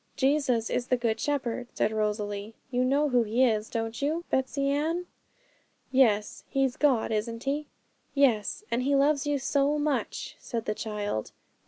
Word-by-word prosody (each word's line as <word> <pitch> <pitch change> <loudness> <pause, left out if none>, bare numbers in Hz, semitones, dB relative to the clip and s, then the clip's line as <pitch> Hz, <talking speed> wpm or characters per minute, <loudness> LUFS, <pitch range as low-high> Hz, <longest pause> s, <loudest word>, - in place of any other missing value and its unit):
'Jesus 265 -5 +1
is 245 - -1
the 255 - +2
Good 230 -2 0
Shepherd,' 255 -4 -1
said 215 - +1
Rosalie; 210 0 -2 0.2
'you 250 0 +2
know 280 +3 +2
who 250 -2 +4
He 230 +4 +3
is, 215 -3 0
don't 225 +1 -3
you, 315 +4 0
Betsey 265 +1 0
Ann?' 315 +5 0 0.9
'Yes, 220 -6 +3
He's 270 -2 +1
God, 265 -8 +2
isn't 230 +2 -2
He?' 285 +2 -1 0.5
'Yes 255 - +2
and 235 - +1
He 280 +2 +2
loves 285 +1 +3
you 290 -1 +2
so 280 +2 +1
much,' 295 -1 -2
said 230 -2 -4
the 210 - 0
child. 210 - -3
255 Hz, 160 wpm, -28 LUFS, 220-280 Hz, 0.9 s, who